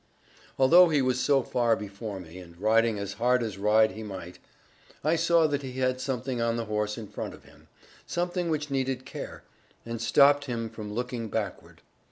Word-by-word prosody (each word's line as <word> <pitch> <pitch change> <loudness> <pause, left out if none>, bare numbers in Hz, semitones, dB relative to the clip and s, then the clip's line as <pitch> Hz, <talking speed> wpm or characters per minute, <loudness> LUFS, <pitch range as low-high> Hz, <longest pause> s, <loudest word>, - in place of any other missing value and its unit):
Although 170 +7 +7
he 150 -2 +2
was 130 0 +1
so 140 -2 +3
far 120 -2 +2
before 100 -1 -6
me, 90 0 -11
and 85 -1 -14
riding 110 +1 +3
as 100 -1 -4
hard 125 0 +3
as 105 -4 -5
ride 110 +2 +4
he 110 - -8
might, 95 -4 -8 0.6
I 155 +3 +3
saw 170 0 +3
that 145 -2 0
he 130 -2 -7
had 130 0 0
something 130 -2 -2
on 115 0 +1
the 115 - -2
horse 105 0 -2
in 110 -2 -7
front - - -6
of - - -19
him; - - -20 0.4
something 175 0 -1
which 150 -2 -2
needed 130 -1 -1
care, - - -8 0.4
and 115 -1 -5
stopped 145 +4 +5
him 115 -4 -4
from 110 -2 -7
looking 120 0 -3
backward. 105 -3 -5
120 Hz, 190 wpm, -28 LUFS, 105-135 Hz, 0.6 s, Although